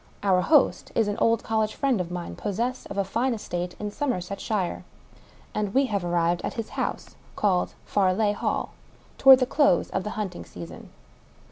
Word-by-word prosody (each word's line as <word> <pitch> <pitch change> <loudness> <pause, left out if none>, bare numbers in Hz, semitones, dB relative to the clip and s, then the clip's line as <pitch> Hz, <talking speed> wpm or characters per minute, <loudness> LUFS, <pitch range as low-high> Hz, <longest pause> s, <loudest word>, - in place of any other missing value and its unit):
Our 185 -2 +3
host 300 - +3
is 225 -2 +2
an 205 - -1
old 230 0 +2
college 220 -1 0
friend 265 -8 +1
of 175 - -5
mine, 175 -1 -5
possessed 235 +6 -3
of 200 - -6
a 200 - +2
fine 235 +5 0
estate 180 -4 -4
in 210 0 -4
Somer 255 -5 -1
•setshire; 195 +1 -3 0.7
and 210 0 -2
we 270 +1 +5
have 200 -3 0
arrived 175 0 +1
at - - -4
his 230 -2 -4
house - - -4
— - - -27
called 185 -4 +1
Farleigh 205 +1 +2
Hall - - -2 0.3
— - - -30
^toward 270 -1 +9
the 255 - +1
close 275 - +2
of 190 - -1
the 210 - -4
hunting 195 -4 -4
season. 85 -2 -10
205 Hz, 190 wpm, -26 LUFS, 180-230 Hz, 0.7 s, ^toward